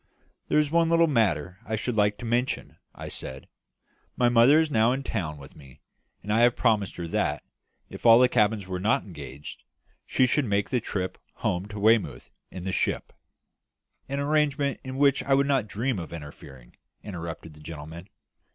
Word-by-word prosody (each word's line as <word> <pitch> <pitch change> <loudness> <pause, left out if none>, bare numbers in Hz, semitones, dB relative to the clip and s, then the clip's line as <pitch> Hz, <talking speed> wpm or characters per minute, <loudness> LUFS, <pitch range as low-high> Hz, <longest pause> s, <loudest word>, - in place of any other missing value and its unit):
"There - - +2
is 150 -1 +2
one 165 0 +3
little 165 0 +5
matter 95 - 0
I 110 - -3
should 115 +2 -3
like 105 -1 +2
to 120 - -8
mention," 120 +3 -1 0.2
I - - -8
said. 65 0 -7 0.7
"My 120 -1 +4
mother 120 +6 +6
is 160 -1 0
now 115 -1 +3
in 135 +1 -3
town 85 - -3
with 70 -2 -13
me, 70 -1 -16 0.4
and 105 +2 -2
I 110 - +3
had 120 0 +5
promised 105 -5 +1
her 85 -1 -5
that, - - -1 0.4
if - - -11
all 115 -1 +8
the 125 +1 +6
cabins 105 -4 +1
were 95 -1 -4
not 105 +4 +1
engaged, 75 -6 -10 0.5
she 130 - +3
should 135 +3 +1
make 100 0 -1
the 125 - +2
trip 95 -3 -4 0.2
home 90 +3 -2
to 105 0 -7
Weymouth 100 - +2 0.2
in 90 - -8
the 95 - -2
ship - - -2 0.5
" - - -46
"An 140 +1 -2
arrangement 145 -1 +1
with 130 0 -6
which 140 0 +3
I 135 - +3
would 140 +1 +3
not 135 -6 +1
dream 115 +1 -2
of 85 - -7
interfering," 70 -5 -11 0.3
interrupted 85 -4 -7
the 75 - -16
gentleman. 80 +4 -9
105 Hz, 190 wpm, -26 LUFS, 85-130 Hz, 0.7 s, all